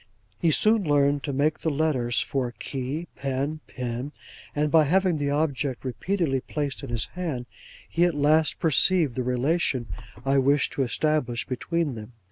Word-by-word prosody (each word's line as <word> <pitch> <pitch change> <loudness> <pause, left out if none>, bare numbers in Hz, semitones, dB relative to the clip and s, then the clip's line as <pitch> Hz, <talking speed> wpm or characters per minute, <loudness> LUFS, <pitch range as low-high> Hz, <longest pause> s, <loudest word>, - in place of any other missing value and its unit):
He 170 - +2
soon 215 +7 +3
learned 145 -2 +2
to 145 - -2
make 145 +3 +1
the 160 - -1
letters 140 -6 +1
for 125 -3 -2
key, 140 +5 -4
pen, 140 +3 -2
pin; 125 +3 -5 0.4
and 150 0 +1
by 160 -2 +6
having 180 +1 +2
the 145 -1 0
object 140 -3 -1
repeatedly 150 +2 -1
placed 145 +1 -4
in 140 - -7
his 115 -1 +3
hand, 155 -9 -3 0.4
he 170 - +1
at 175 -3 0
last 150 +2 +3
perceived 165 -2 +4
the 130 - -2
relation 125 +1 0 0.4
I 135 0 +3
wished 140 +2 +2
to - - -1
establish 130 -1 0
between 150 +4 -2
them. 110 +1 -9
145 Hz, 160 wpm, -25 LUFS, 130-160 Hz, 0.4 s, by